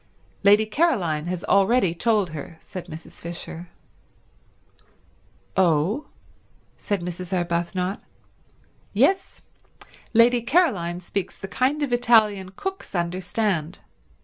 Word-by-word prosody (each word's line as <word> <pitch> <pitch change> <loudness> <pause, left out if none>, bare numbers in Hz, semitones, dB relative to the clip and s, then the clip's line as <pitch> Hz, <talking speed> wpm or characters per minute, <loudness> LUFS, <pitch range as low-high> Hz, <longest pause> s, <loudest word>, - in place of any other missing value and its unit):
"Lady 205 +2 +6
Caroline 200 - +1
has 180 -1 -3
already 195 -1 +3
told 205 -1 +1
her," 155 +2 -8
said 185 -1 -8
Mrs. 160 -1 -11
Fisher. 170 0 -7 1.9
"Oh?" 185 - +2 0.7
said 205 -4 -2
Mrs. 180 +1 -6
Arbuthnot. 180 +2 -1 0.9
"Yes. 385 0 +1 0.7
Lady 240 +1 +5
Caroline 225 - +1
speaks 185 +1 -4
the 195 - -7
kind 270 +8 0
of 265 -4 -1
Italian 215 -6 +4
cooks 385 - -6
understand. 180 0 -1
190 Hz, 95 wpm, -24 LUFS, 170-230 Hz, 1.9 s, Lady